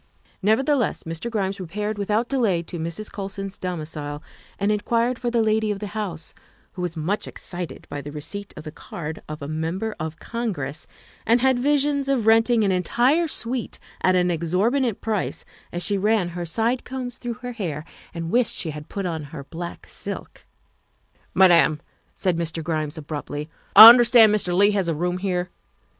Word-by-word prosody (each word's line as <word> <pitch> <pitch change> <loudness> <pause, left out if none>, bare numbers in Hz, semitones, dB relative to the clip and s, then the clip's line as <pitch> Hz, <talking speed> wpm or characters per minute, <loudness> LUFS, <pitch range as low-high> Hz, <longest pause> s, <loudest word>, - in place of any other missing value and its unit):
Nevertheless, 245 +5 +1
Mr. 165 +8 -5
Grimes 195 -3 -2
repaired 205 +4 -4
without 210 +4 0
delay 220 -11 +1
to 170 +1 -7
Mrs. 170 +6 -4
Colson's 195 -1 -5
domicile 155 -4 -5 0.3
and 200 +1 +1
inquired 235 +4 0
for 245 - -1
the 235 -1 +2
lady 215 0 +1
of 205 - -1
the 210 - -5
house, 185 -7 -4 0.4
who 185 - -7
was 175 -2 -3
much 180 +7 -2
excited 175 -1 -7
by 145 - -5
the 145 +1 -8
receipt 200 +7 -6
of - - -8
the 155 - -7
card 160 0 -7
of 155 -1 -6
a - - -5
Member 165 +8 -3
of 160 0 -4
Congress, 165 - -4 0.4
and 235 +2 +3
had 260 0 +3
visions 285 0 +1
of 255 -5 +1
renting 225 +1 +4
an 195 - +2
entire 245 - +2
suite 245 -5 -2 0.2
at 185 0 +3
an 180 -1 +2
exorbitant 195 - 0
price 215 -3 -2 0.3
as 175 +1 -3
she 200 +3 +1
ran 210 -3 +2
her 175 0 -5
side 230 +8 0
combs 250 -2 -5
through 240 -1 -4
her 245 +2 -7
hair 165 -10 -4 0.3
and 165 0 -5
wished 245 0 +2
she 160 - -3
had 150 0 -9
put 200 -2 -4
on 160 -4 -3
her 145 -1 -8
black 170 +4 -7
silk. - - -6 0.3
' - - -43
' - - -37
Madam, 170 -5 +5
' - - -40
' - - -41
said 180 -4 0
Mr. 165 -1 -3
Grimes 155 -1 -2
abruptly, 150 0 -6
' - - -32
' - - -33
I 220 - +14
understand 235 -2 +8
Mr. 200 -4 +1
Leigh 200 +4 +4
has 195 -4 0
a 165 - 0
room 180 +3 -1
here. 180 -2 -2
195 Hz, 190 wpm, -23 LUFS, 165-225 Hz, 0.4 s, I